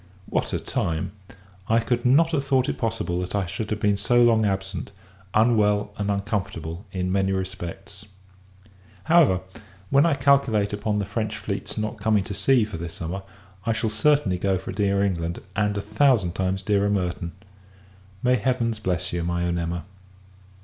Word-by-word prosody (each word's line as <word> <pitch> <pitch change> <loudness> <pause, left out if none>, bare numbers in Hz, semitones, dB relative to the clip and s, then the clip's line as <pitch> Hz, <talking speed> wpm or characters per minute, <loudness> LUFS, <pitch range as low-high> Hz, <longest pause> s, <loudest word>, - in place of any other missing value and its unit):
What - - -1
a - - 0
time! 80 +2 -2 0.6
I 115 +1 +4
could 120 +1 -1
not 155 +7 +5
have 145 -4 0
thought 135 -2 +2
it - - -3
possible 110 -6 -1
that 90 +2 -4
I 100 -2 +1
should 105 +5 -5
have 105 - -2
been 105 -1 +2
so 120 +4 +3
long 110 -2 +4
absent; 95 -1 -3 0.4
unwell, 105 -2 +3
and 100 0 -2
uncomfortable, 100 -4 -3
in 90 -1 -2
many 95 0 +1
respects. 95 +1 -6 1.0
However, 160 - +4 0.5
when 140 +4 +5
I 160 - +2
calculate 130 -7 +3
upon 105 0 -1
the 100 - -1
French 110 +1 -3
fleet's 100 0 -4
not 110 +1 -3
coming 105 -1 +2
to 100 - -6
sea 125 +4 +3
for 105 -5 -7
this 85 0 -6
summer, 90 +4 -4 0.5
I 115 - +3
shall 110 0 -1
certainly 110 -5 +2
go 95 0 +1
for - - -6
dear 100 -1 +1
England, 85 -3 -1 0.2
and 105 0 +1
a - - -1
thousand 105 -2 +2
[times] 95 +1 -1
dearer 100 0 +2
Merton. 90 -3 -2 0.9
May 125 0 +4
Heavens 120 -4 0
bless 90 -6 -2
you, 85 -1 -1
my 85 0 -1
own 85 0 0
Emma! 85 -1 -3
100 Hz, 170 wpm, -24 LUFS, 95-115 Hz, 1.0 s, not